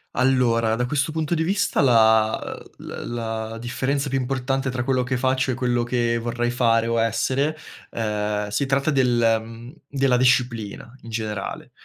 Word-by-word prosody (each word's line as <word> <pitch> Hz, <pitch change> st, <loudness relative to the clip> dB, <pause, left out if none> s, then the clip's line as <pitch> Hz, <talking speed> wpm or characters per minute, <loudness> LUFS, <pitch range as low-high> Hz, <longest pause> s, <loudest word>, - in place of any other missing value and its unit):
Allora, 120 Hz, -3 st, +2 dB
da 125 Hz, +1 st, -1 dB
questo 145 Hz, +2 st, 0 dB
punto 160 Hz, +1 st, -1 dB
di 160 Hz, -, 0 dB
vista 200 Hz, 0 st, +1 dB
la, 110 Hz, -3 st, +4 dB, 0.4 s
uhm -, -, -12 dB
l -, -, -6 dB, 0.2 s
la 110 Hz, 0 st, -4 dB
differenza 135 Hz, +4 st, -2 dB
più 135 Hz, -, 0 dB
importante 135 Hz, +1 st, -1 dB
tra 125 Hz, -1 st, -2 dB
quello 130 Hz, -1 st, +1 dB
che 125 Hz, 0 st, -1 dB
faccio 130 Hz, 0 st, +1 dB
e -, -, -1 dB
quello 120 Hz, -1 st, 0 dB
che 120 Hz, -1 st, 0 dB
vorrei 120 Hz, +1 st, -2 dB
fare 115 Hz, -2 st, +2 dB
o 115 Hz, 0 st, +1 dB
essere, 130 Hz, +7 st, 0 dB, 0.4 s
uhm, 105 Hz, -2 st, -2 dB
si 105 Hz, +7 st, -1 dB
tratta 135 Hz, +2 st, +1 dB
del, 120 Hz, -5 st, +3 dB
mhmm 115 Hz, +4 st, -11 dB
della 135 Hz, -2 st, +1 dB
disciplina 120 Hz, -4 st, 0 dB
in 115 Hz, -, -11 dB
generale. 110 Hz, -3 st, -4 dB
120 Hz, 165 wpm, -23 LUFS, 115-135 Hz, 0.4 s, la